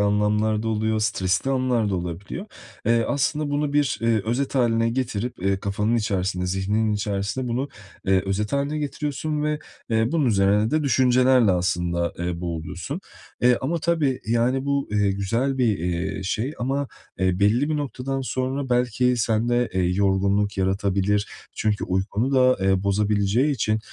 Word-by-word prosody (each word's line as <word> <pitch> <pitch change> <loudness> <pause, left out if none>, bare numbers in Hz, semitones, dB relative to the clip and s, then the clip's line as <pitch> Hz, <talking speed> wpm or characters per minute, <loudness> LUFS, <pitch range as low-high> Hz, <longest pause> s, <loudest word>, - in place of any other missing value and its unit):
anlamlar 105 +1 +1
da 115 - -2
oluyor, 110 0 0
stresli 100 +2 0
anlar 130 -4 +1
da - - 0
olabiliyor. 90 - -5 0.4
Eee, 115 0 +3
aslında 145 +1 0
bunu 145 0 0
bir, 145 -5 +1
eee, 115 -2 +2
özet 125 +6 -1
hâline 115 -3 +2
getirip, 125 -1 -3
eee, 95 0 +2
kafanın 105 +4 0
içerisinde, 95 -4 -1
zihninin 100 +4 0
içerisinde 105 +4 -2
bunu, 130 +4 -1 0.4
eee, 95 -1 +3
özet 100 +2 -1
hâline 140 +2 0
getiriyorsun 150 +1 -3
ve, 150 0 0 0.3
eee, 110 +2 +1
bunun 160 -4 +2
üzerine 105 0 +3
de 155 0 +1
düşüncelerle 130 -3 +4
aslında, 85 -1 0
eee, 85 -1 -3
boğuluyorsun. 85 - -5 0.4
Eee, 125 0 +5
ama 165 +6 -1
tabii, 155 -6 0
yani, 120 +4 +1
bu, 140 0 0
eee, 105 -1 +2
güzel 115 +8 -1
bir, 115 -6 +2
eee, 90 +3 -2
şey 110 +8 -2
ama, 135 +3 -1 0.3
eee, 95 -1 +1
belli 115 +8 +3
bir 155 - +1
noktadan 135 -1 -3
sonra 130 +1 -2
belki 125 0 +2
sende, 120 +1 +1
eee, 95 - +1
yorgunluk 100 +2 +1
yaratabilir. 100 +1 +1 0.3
Çünkü 105 -1 0
uykunu 100 +7 -1
da, 130 -1 +5
eee, 95 -1 +2
bozabileceği 100 +6 +1
için, 110 -3 0
110 Hz, 155 wpm, -24 LUFS, 100-130 Hz, 0.4 s, Eee